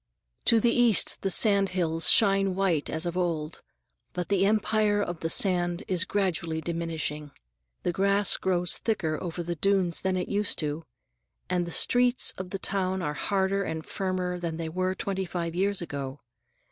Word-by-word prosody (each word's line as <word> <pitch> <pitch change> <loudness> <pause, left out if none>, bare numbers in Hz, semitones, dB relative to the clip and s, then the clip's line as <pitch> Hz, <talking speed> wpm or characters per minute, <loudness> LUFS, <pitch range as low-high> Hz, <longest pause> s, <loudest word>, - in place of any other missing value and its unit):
To 230 - +4
the 235 +1 +2
east 240 -4 +3
the 195 - -1
sand 200 0 +3
hills 165 -2 +2
shine 195 -3 +4
white 180 -6 0
as 160 +2 -3
of 175 0 -3
old, 165 -4 -3 0.5
but 180 -1 -4
the 195 -1 +2
empire 215 0 +1
of 175 -5 -3
the 165 - -3
sand 175 +1 +2
is 185 0 +2
gradually 170 -6 -2
diminishing. 160 -2 -4 0.5
The - - 0
grass 200 +2 +3
grows 180 -2 +1
thicker 165 -9 -2
over 175 -1 -5
the 175 +1 -3
dunes 185 0 +2
than 190 -1 -1
it 180 - -3
used 205 0 0
to, 155 +1 -4 0.7
and 175 -1 0
the - - -6
streets 245 +6 +3
of 185 -1 -6
the 195 - -4
town 190 -1 -1
are 150 - -2
harder 195 +5 -1
and 160 -3 -5
firmer 185 -2 -3
than 165 -2 -4
they 165 -1 -4
were 185 +3 -2
twenty 190 0 -3
five 170 -1 -4
years 195 +1 0
ago. 140 -3 -6
180 Hz, 170 wpm, -27 LUFS, 165-195 Hz, 0.7 s, To